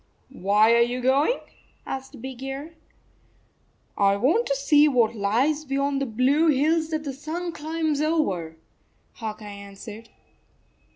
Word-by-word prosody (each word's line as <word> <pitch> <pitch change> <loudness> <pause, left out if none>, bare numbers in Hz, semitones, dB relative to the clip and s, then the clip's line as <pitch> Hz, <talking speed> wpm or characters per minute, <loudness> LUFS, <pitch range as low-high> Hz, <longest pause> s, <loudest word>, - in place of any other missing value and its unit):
"Why 210 +4 +4
are 235 - +5
you 240 +1 +1
going?" 275 - +2 0.4
asked 265 -3 -7
Big 260 -1 -7
Ear. 270 +4 -6 0.6
" - - -40
I 200 - +2
want 330 - +2
to 275 - +1
see 290 +2 +4
what 240 -6 +2
lies 245 +10 +1
beyond 275 0 -1
the 275 - -1
blue 260 +8 +2
hills 315 +3 +2
that 310 -1 -2
the 280 -2 -4
sun 320 +6 -5
climbs 315 -1 -2
over," 195 - -1 0.6
Hawk 215 -2 -6
Eye - - -9
answered. 205 +2 -10
270 Hz, 140 wpm, -25 LUFS, 225-305 Hz, 0.6 s, are